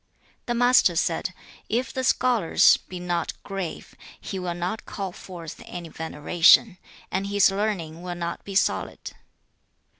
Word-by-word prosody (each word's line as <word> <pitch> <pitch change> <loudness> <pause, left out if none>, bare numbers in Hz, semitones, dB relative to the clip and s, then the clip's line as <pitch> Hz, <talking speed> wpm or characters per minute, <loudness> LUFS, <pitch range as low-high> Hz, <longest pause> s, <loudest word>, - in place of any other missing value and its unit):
The 240 - 0
Master 245 -7 +5
said, 165 +2 0 0.4
'If 245 +4 -1
the 260 - -2
scholar 245 -8 +1 0.3
be 180 - -6
not 175 -1 -2
grave, 195 -4 -6 0.3
he 190 - -5
will 180 -1 -3
not 180 +5 -4
call 195 -2 -4
forth 175 -3 -10
any 175 -2 -7
veneration, 165 +5 +3 0.3
and 195 +1 -1
his 200 -1 +4
learning 195 -6 -2
will 180 0 -5
not 170 -1 -4
be 195 - -8
solid. - - 0
180 Hz, 140 wpm, -25 LUFS, 170-205 Hz, 0.4 s, Master